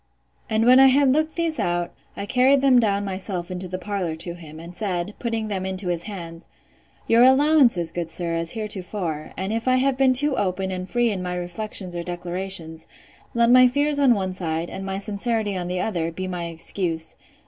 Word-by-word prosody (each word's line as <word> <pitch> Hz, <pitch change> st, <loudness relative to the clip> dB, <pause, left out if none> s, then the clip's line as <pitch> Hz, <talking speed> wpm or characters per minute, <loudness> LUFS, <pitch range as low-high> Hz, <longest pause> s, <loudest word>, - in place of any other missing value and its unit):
And 220 Hz, 0 st, +2 dB
when 255 Hz, +2 st, +7 dB
I 270 Hz, -, +8 dB
had 270 Hz, 0 st, +4 dB
looked 310 Hz, +1 st, 0 dB
these 330 Hz, -2 st, -1 dB
out, 175 Hz, 0 st, -1 dB, 0.2 s
I 200 Hz, -, -4 dB
carried 260 Hz, +4 st, +3 dB
them 265 Hz, -2 st, +5 dB
down 205 Hz, -3 st, +1 dB
myself 185 Hz, -2 st, -4 dB
into 185 Hz, 0 st, -5 dB
the 185 Hz, +1 st, -4 dB
parlour 185 Hz, -4 st, -3 dB
to 170 Hz, +2 st, -5 dB
him; 160 Hz, -2 st, -11 dB
and 170 Hz, +2 st, -10 dB
said, 185 Hz, -1 st, -3 dB
putting 225 Hz, -2 st, -2 dB
them 195 Hz, -3 st, -3 dB
into 190 Hz, -1 st, -3 dB
his 170 Hz, -1 st, -1 dB
hands, 170 Hz, -5 st, -8 dB, 0.6 s
Your 230 Hz, +1 st, +4 dB
allowances, 260 Hz, -, +5 dB
good 170 Hz, -1 st, -4 dB
sir, 170 Hz, +1 st, -3 dB
as 165 Hz, 0 st, -1 dB
heretofore; 185 Hz, -7 st, -4 dB
and 190 Hz, +3 st, -2 dB
if 225 Hz, +2 st, -3 dB
I 255 Hz, -, +4 dB
have 260 Hz, 0 st, +1 dB
been 265 Hz, -1 st, +4 dB
too 285 Hz, +2 st, +2 dB
open 190 Hz, -1 st, -1 dB
and 185 Hz, 0 st, -5 dB
free 240 Hz, +2 st, +2 dB
in 190 Hz, -3 st, -3 dB
my 180 Hz, 0 st, -3 dB
reflections 180 Hz, +1 st, -3 dB
or 170 Hz, -, -2 dB
declarations, 175 Hz, -2 st, -4 dB, 0.5 s
let 235 Hz, 0 st, +4 dB
my 255 Hz, 0 st, +8 dB
fears 285 Hz, +3 st, +1 dB
on 265 Hz, -4 st, +5 dB
one 190 Hz, -2 st, -2 dB
side, 165 Hz, -2 st, -3 dB
and 195 Hz, -, -6 dB
my 195 Hz, 0 st, -3 dB
sincerity 210 Hz, +1 st, -2 dB
on 180 Hz, -1 st, -3 dB
the 180 Hz, 0 st, -2 dB
other, 170 Hz, -6 st, -2 dB
be 185 Hz, +3 st, -5 dB
my 180 Hz, -2 st, -4 dB
excuse. 165 Hz, 0 st, -3 dB
190 Hz, 205 wpm, -23 LUFS, 175-235 Hz, 0.6 s, I